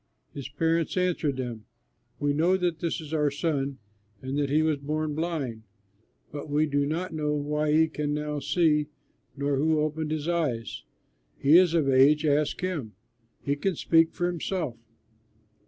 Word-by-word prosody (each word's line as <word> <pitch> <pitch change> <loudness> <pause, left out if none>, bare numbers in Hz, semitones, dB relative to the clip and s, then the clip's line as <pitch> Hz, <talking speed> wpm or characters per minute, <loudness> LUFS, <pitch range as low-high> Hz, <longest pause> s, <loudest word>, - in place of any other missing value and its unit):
His 140 -1 -6
parents 165 +4 0
answered 170 -6 0
them, 120 -4 -5 0.5
"We 145 0 +1
know 170 +6 +3
that 175 -3 -1
this 170 +1 -2
is 155 0 -9
our 150 -2 +2
son 140 -2 -2 0.4
and 130 +4 -5
that 140 -1 0
he 155 +3 +3
was 155 -2 +1
born 155 +1 -2
blind, 150 -8 -3 0.7
but 145 +1 -7
we 150 +2 +2
do 145 -1 0
not 170 +4 -3
know 150 -1 -1
why 150 +1 0
he 160 +1 +5
can 150 -2 -3
now 150 0 -2
see 150 -1 +2 0.5
nor 140 0 0
who 155 +2 +2
opened 155 +1 -1
his 155 0 -3
eyes. 150 -10 -1 0.6
He 145 +3 +4
is 175 -1 +6
of 155 -4 +2
age; 140 +3 +5
ask 150 +2 +1
him, 160 - -3 0.5
he 140 - 0
can 185 +5 -1
speak 165 +1 +3
for 175 - -1
himself." 175 -5 -2
150 Hz, 165 wpm, -27 LUFS, 145-160 Hz, 0.7 s, is